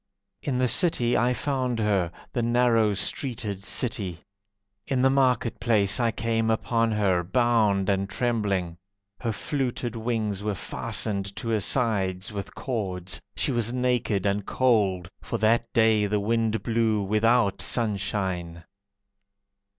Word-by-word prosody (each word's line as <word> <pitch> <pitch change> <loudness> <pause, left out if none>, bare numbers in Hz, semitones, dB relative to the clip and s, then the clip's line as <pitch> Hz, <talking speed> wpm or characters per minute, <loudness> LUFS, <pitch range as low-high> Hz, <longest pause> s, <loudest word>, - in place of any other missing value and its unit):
In 135 -4 -2
the 130 0 +2
city 125 -6 +2
I 125 +1 +2
found 130 -4 -1
her, 100 -6 +1 0.2
The 120 - 0
narrow 115 -2 +3
streeted 105 0 -2
city. 100 -6 -2 0.6
In 130 -2 0
the 135 - +5
market 130 -3 +1
place 105 -3 +2
I 120 -1 +2
came 115 0 -1
upon 115 +1 +1
her, 95 -4 +1
Bound 110 -2 +2
and 100 -1 0
trembling. 100 -6 -1 0.4
Her 115 - -2
fluted 125 0 -3
wings 110 -3 -2
were 105 -1 -2
fastened 100 -1 -3
to 115 - -5
her 110 -1 +2
sides 100 -5 0
with 100 -1 -6
cords, 95 -8 -4
She - - 0
was 120 -1 0
naked 125 -6 0
and 100 0 0
cold, 100 -8 +1
For - - -3
that 115 +2 +2
day 110 -3 +3
the 105 +1 0
wind 110 +1 0
blew 110 -3 +1
Without 110 +1 +2
sunshine. 95 -6 -1
110 Hz, 135 wpm, -26 LUFS, 100-120 Hz, 0.6 s, the